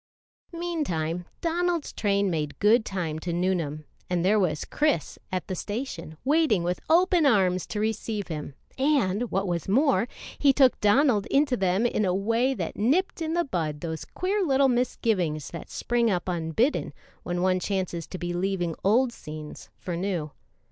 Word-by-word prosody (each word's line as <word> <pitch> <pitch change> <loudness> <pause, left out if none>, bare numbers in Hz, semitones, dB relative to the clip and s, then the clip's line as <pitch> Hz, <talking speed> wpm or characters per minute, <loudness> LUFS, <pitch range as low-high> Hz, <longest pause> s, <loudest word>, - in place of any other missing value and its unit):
Meantime, 180 - -2 0.2
Donald's 345 -1 0
train 200 -2 +1
made 150 -3 -2
good 220 +3 +4
time 170 -7 -3
to 170 +2 -4
Nuneham; 170 -4 -1 0.2
and 180 -1 0
there 210 +3 +4
was 160 -6 0
Chris 295 - 0
at 185 -1 -2
the - - -3
station 185 - -5
waiting 285 - +3
with 175 +1 -1
open 350 +1 +4
arms 190 - +3
to 210 - -4
receive 215 -1 -2
him, 150 -4 -6 0.2
and, 245 -6 +2
what 195 +1 0
was 170 -2 -2
more, 260 +1 +3 0.3
he 280 - +6
took 265 -2 +4
Donald 215 0 +3
into 275 -2 +2
them 195 +1 +1
in 225 -2 +1
a 185 -2 +1
way 230 +7 +1
that - - -4
nipped 310 - +1
in 320 +1 -1
the 345 0 +1
bud 155 - -3
those 160 -1 -4
queer 390 +3 -2
little 275 -4 +3
misgivings 205 - 0
that 170 - -8
spring 240 -1 0
up 180 -3 -1
unbidden 175 - 0 0.3
when 175 0 -2
one 185 0 +2
chances 180 -4 -2
to 185 - -6
be 175 0 -3
leaving 175 -2 -1
old 235 +5 +3
scenes 155 -4 -9
for 175 - -4
new. 170 -4 -2
200 Hz, 165 wpm, -26 LUFS, 175-260 Hz, 0.3 s, he